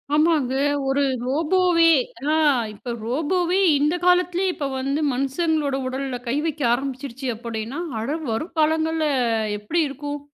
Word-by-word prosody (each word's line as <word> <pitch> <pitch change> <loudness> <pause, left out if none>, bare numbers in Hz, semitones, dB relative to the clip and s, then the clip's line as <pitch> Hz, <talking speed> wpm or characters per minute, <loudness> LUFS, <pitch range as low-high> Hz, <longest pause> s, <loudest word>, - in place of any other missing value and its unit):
ஆமாங்க. 305 -5 +2 0.3
ஒரு 275 +1 +2 0.2
ரோபோவே 335 +4 +3 0.4
ஆ - - +3 0.4
இப்ப 235 +3 -6
ரோபோவே 335 - 0 0.2
இந்த 300 +4 +2
காலத்தலே 360 +1 +3
இப்ப 285 - -3
வந்து 275 +3 -1
மனுசங்காலோட 280 +2 0
உடல்ல 265 0 -3
கை 235 - 0
வைக்க 315 -2 -3
ஆரம்பிச்சுடுச்சு 265 0 -4
அப்படின்னா, 230 +4 -5 0.2
அட 280 +8 -2
வரும் 310 +10 -4
காலங்கள்ல 315 0 +1 0.5
எப்படி 315 +12 0
இருக்கும்? 290 +1 -5
290 Hz, 120 wpm, -23 LUFS, 260-325 Hz, 0.5 s, ரோபோவே